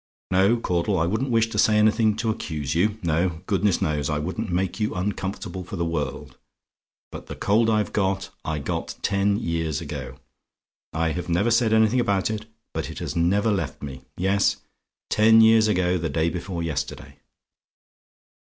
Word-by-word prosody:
"No, 95 +5 +4
Caudle; 95 -2 0
I 80 - +2
wouldn't 110 +9 -1
wish 115 -1 +2
to 105 - -2
say 105 0 +4
anything 110 0 +3
to 110 0 0
accuse 75 -8 -4
you: 100 +6 +1
no, 85 +1 0
goodness 100 -1 +1
knows, 75 -2 -1
I 75 - 0
wouldn't 95 +7 -3
make 90 +3 -1
you 105 - -1
uncomfortable 95 0 -3
for 90 - -7
the 85 -2 -1
world, 75 -5 -4 0.7
but - - -9
the - - -6
cold 110 +3 +2
I've 105 -1 +1
got, 95 -1 -1
I 80 -1 -2
got 70 - -4
ten 100 0 +2
years 80 -5 -2
ago. - - -7 0.7
I 80 +1 0
have 90 +2 -4
never 95 +8 +2
said 115 -1 +3
anything 110 +2 +4
about 100 -3 +1
it 110 0 -4 0.3
but - - -3
it - - -8
has - - -4
never 100 +6 +2
left 85 -11 -3
me. 65 -2 -7 0.2
Yes; 95 +2 +2 0.5
ten 110 +1 +6
years 110 -1 +6
ago 90 -3 +1
the 80 0 -2
day 80 +1 0
before 90 -1 -4
yesterday. 80 -4 -4
95 Hz, 170 wpm, -24 LUFS, 85-110 Hz, 0.7 s, ten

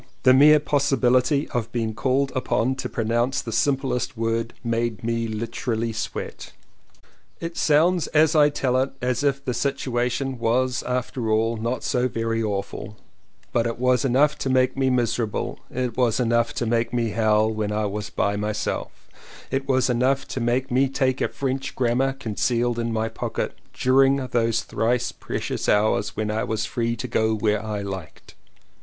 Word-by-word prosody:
The 130 - +7
mere 150 +3 +7
possibility 140 -1 +2
of 120 -3 -3
being 115 -2 -2
called 135 +4 0
upon 130 -1 0
to - - -4
pronounce 120 +3 0
the 115 - -5
simplest 130 -1 0
word 115 +1 -1
made 115 -2 -1
me 115 0 -1
literally 115 +1 -3
sweat. 115 - -5 0.9
It 165 0 -5
sounds 165 +2 +3
as 155 +1 +3
I 150 -1 +6
tell 130 -3 0
it 135 +1 0
as 125 +2 -1
if 140 -1 0
the 125 - -1
situation 130 0 -1
was 125 +2 +1
after 125 -2 -2
all 110 +1 +2
not 115 +3 -3
so 125 0 +1
very 115 -1 -2
awful 105 0 -4 0.3
— - - -36
but 115 -1 +2
it 115 - -3
was 125 +1 +2
enough 140 +3 +3
to 135 - -2
make 130 -1 +2
me 135 -1 +1
miserable, 120 -3 -1
it 125 -2 -3
was 125 -3 +2
enough 120 -1 +2
to 120 - -1
make 115 0 0
me 120 -2 0
howl 110 0 +2
when 110 -1 -2
I 105 0 0
was 105 +1 -4
by 100 0 0
myself, 105 +1 -3 0.4
it 135 +1 -1
was 130 -2 +2
enough 130 +2 +1
to - - -3
make 125 +3 0
me 130 +2 +3
take 130 -1 0
a - - +2
French 135 0 -3
grammar, 130 +2 +1
concealed 120 -1 -1
in 115 0 -1
my 110 0 0
pocket, - - -3 0.2
during 135 +1 +4
those 120 -4 0
thrice 120 +2 0
precious - - -4
hours 105 0 +2
when 105 0 -1
I 110 +1 -1
was 110 -1 -2
free 115 -1 -1
to - - -5
go 110 0 +1
where 105 0 0
I 105 -2 -3
liked. 95 -5 -8
120 Hz, 170 wpm, -24 LUFS, 115-130 Hz, 0.9 s, The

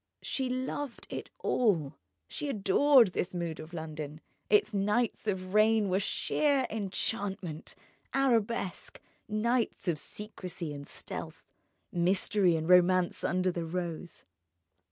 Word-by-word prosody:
She 265 -2 -1
loved 260 +1 -3
it - - -5
all, 170 - +1 0.3
she 295 - -4
adored 230 +1 +5
this 180 +1 -2
mood 170 -2 -3
of 155 +1 -9
London: 155 -2 -6 0.3
its 210 +1 +4
nights 210 +3 0
of 185 -2 -2
rain 215 -1 +4
were 185 +1 +2
sheer 275 +6 +1
enchantment, 195 -4 -3 0.4
arabesque, 235 -7 0 0.3
nights 225 +1 0
of 165 -4 +1
secrecy 180 -6 -7
and 145 0 -8
stealth, - - -6 0.5
mystery, 180 +1 +2
and 160 0 -2
romance 180 0 +4
under 185 +1 +1
the 170 -1 -3
rose. 170 0 -5
190 Hz, 115 wpm, -30 LUFS, 175-225 Hz, 0.5 s, adored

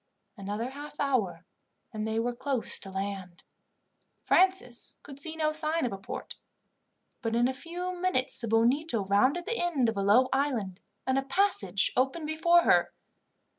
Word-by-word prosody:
Another 210 +5 -4
half 295 +2 -10
hour 255 -9 0 0.5
and 215 0 -3
they 220 0 -2
were 240 +2 0
close 260 0 -1
to 195 - -9
land. 190 -2 -5 0.8
Francis 370 -11 +1
could 280 -1 -10
see 320 +2 -3
no 310 -1 +1
sign 310 0 +3
of 235 - -2
a - - -5
port, 195 - -7 0.8
but 230 -2 -1
in 240 +1 +3
a 260 - -2
few 350 +6 -5
minutes 350 -8 -1
the 235 - -4
Bonito 230 +2 +2
rounded 255 - +2
the 465 +2 -2
end 300 -9 +1
of 220 - -4
a - - 0
low 215 +6 +5
island, 240 -9 -1 0.3
and 260 +1 +2
a - - -3
passage 270 - +1
opened 270 +6 0
before 340 +3 +3
her. - - +3
260 Hz, 165 wpm, -29 LUFS, 220-315 Hz, 0.8 s, low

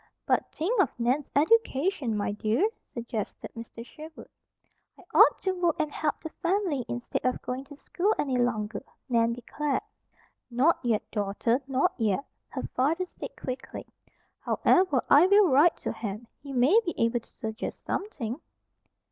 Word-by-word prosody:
"But - - +1
think 390 +8 +1
of 370 - -1
Nan's 255 +5 0
education, 300 - +2
my 205 - -1
dear," 215 - +1 0.2
suggested 235 -3 -5
Mr. 230 0 -9
Sherwood. 310 +4 -12 0.7
"I - - -16
ought - - +7
to 380 - +1
work 355 -3 +1
and 305 -1 0
help 300 0 -2
the 320 - -6
family 350 -7 0
instead 240 0 -3
of 255 0 0
going 255 +2 -4
to 290 - -12
school 385 +7 0
any 270 -3 0
longer," 225 -4 0 0.3
Nan 230 -1 +3
declared. 280 +5 -2 0.7
"Not 260 +7 +3
yet, 230 -4 +1
Daughter, 215 +4 0
not 270 0 +1
yet," 220 +4 +1 0.2
her - - -5
father 315 +8 +1
said - - -9
quickly. 255 0 -6 0.5
"However, 360 -9 +3
I 305 +6 +7
will 400 -1 +6
write 290 +6 +5
to - - -1
Hen. 220 0 -5 0.2
He 280 -1 -9
may 270 - +5
be 345 - -3
able 230 +1 +2
to - - -22
suggest 220 +1 -6
something." 275 - -3
265 Hz, 155 wpm, -28 LUFS, 235-330 Hz, 0.7 s, ought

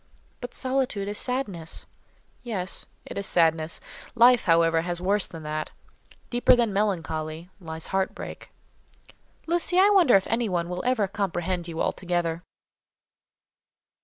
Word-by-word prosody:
"But 245 - -7
solitude 255 -6 -1
is 205 0 -3
sadness." 200 -11 -3 0.6
"Yes; 195 -6 -4 0.2
it - - -5
is 200 - -1
sadness. 165 -1 +2 0.4
Life, 245 +1 +6
however; 165 -2 +4
has 175 0 -3
worse 195 +2 +2
than 165 -2 -10
that. 155 0 -3 0.6
Deeper 245 +1 +5
than 235 -4 +1
melancholy, 165 -4 -2
lies 160 -3 -6
heart 190 0 0
break." - - -8 1.0
"Lucy, 345 +1 +1
I 400 +2 +6
wonder 355 - +6
if 195 - +4
anybody 200 -7 0
will 180 0 -4
ever 250 -5 +2
comprehend 180 -2 -2
you 165 -1 -6
altogether." 175 -2 -1
190 Hz, 130 wpm, -26 LUFS, 165-235 Hz, 1.0 s, Life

